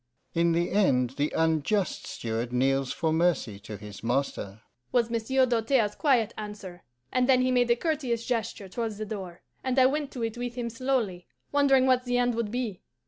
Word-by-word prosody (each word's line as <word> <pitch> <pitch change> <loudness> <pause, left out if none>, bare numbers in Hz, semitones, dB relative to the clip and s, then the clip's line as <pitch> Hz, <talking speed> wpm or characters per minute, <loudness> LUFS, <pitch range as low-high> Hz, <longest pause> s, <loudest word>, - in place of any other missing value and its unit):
'In 170 0 +3
the 170 +1 0
end 130 - +3
the 145 +2 -1
unjust 160 +5 +1
steward 115 +1 -3
kneels 135 +1 +1
for 160 -1 0
mercy 160 - +1
to 105 0 -8
his 105 +1 -10
master,' 115 -4 -2 0.3
was 235 -2 +2
Monsieur 255 +3 +2
Doltaire's 230 -2 +2
quiet 255 -8 +2
answer; 205 -4 -8 0.3
and 255 0 +1
then 255 -1 +5
he 255 - +2
made 245 -1 +3
a 235 - +5
courteous 250 -6 -1
gesture 225 -4 -2
towards 220 +2 -4
the 215 - -4
door, 190 -5 -7 0.2
and 260 0 -1
I 260 - +7
went 285 +1 +1
to 245 - -4
it 225 +1 -3
with 245 0 -4
him 235 -2 -3
slowly, 230 -7 -1 0.2
wondering 275 -2 +4
what 255 -1 +3
the 245 0 +1
end 245 0 +2
would 230 -2 -2
be. 230 -5 -3
220 Hz, 190 wpm, -28 LUFS, 165-250 Hz, 0.3 s, I